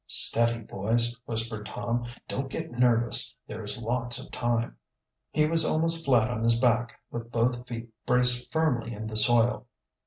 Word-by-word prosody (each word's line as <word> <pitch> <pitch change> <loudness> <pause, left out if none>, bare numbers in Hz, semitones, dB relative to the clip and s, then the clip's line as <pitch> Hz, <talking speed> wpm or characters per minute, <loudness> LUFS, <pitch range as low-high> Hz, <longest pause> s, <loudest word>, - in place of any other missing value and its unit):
"Steady, 115 0 +3
boys!" 115 +4 0
whispered 110 -2 -4
Tom. 120 0 -3 0.2
"Don't 135 +1 -4
get 160 +4 -6
nervous. 120 0 +1
There 110 +1 -7
is 105 +4 -2
lots 120 +1 0
of - - -7
time." 120 -1 -2 0.5
He 150 - +1
was 165 +1 +3
almost 165 +1 +1
flat 120 -5 +3
on 120 -2 -4
his 115 0 +2
back, 120 -1 0
with 115 0 -7
both 120 +1 -1
feet 115 -1 -7 0.2
braced 125 0 +4
firmly 125 -8 -1
in 110 +1 -7
the 110 0 -6
soil. 120 +2 +5
120 Hz, 160 wpm, -27 LUFS, 115-125 Hz, 0.5 s, soil